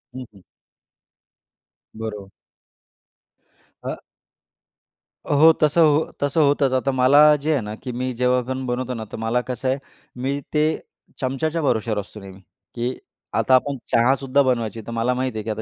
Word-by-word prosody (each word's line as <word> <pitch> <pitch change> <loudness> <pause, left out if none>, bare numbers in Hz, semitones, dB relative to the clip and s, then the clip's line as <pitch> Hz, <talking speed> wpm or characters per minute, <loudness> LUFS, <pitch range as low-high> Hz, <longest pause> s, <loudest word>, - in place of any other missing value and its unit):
हं, 130 - -6
हं. 95 - -17 1.6
बरोबर. 105 -3 -6 1.5
अ. - - -5 1.3
हो. 150 +3 +7
तसं 150 +2 +4
हो 155 0 +3
तसं 145 +3 +1
होतंच. 140 -2 +2
आता 130 +1 +1
मला 130 +2 +4 0.2
जे 155 +2 0
आहे 140 - +1
ना, 105 0 -6
की 125 - -7
मी 125 +1 -3
जेव्हा 125 0 +3
पण 130 0 -3
बनवतो 125 0 -2
ना, 110 -2 -5
तर - - -6
मला 120 +2 +1
कसं 125 +1 -3
आहे 130 - +1 0.4
मी 140 +2 -1
ते 150 -1 +3 0.6
चमच्याच्या 155 +5 -1
भरोशावर 110 -6 0
असतो 105 +2 -9
नेहमी, 95 -1 -12 0.4
की 120 +2 -2 0.4
आता 130 - +4
आपण 140 +2 +1
चहासुद्धा 135 +3 +3
बनवायची. 115 -4 -1
तर - - -5
मला 115 +2 0
माहीत 130 -1 -2
आहे 110 - -3
की 110 - -6
आता 110 +1 -3
130 Hz, 160 wpm, -22 LUFS, 115-140 Hz, 1.6 s, हो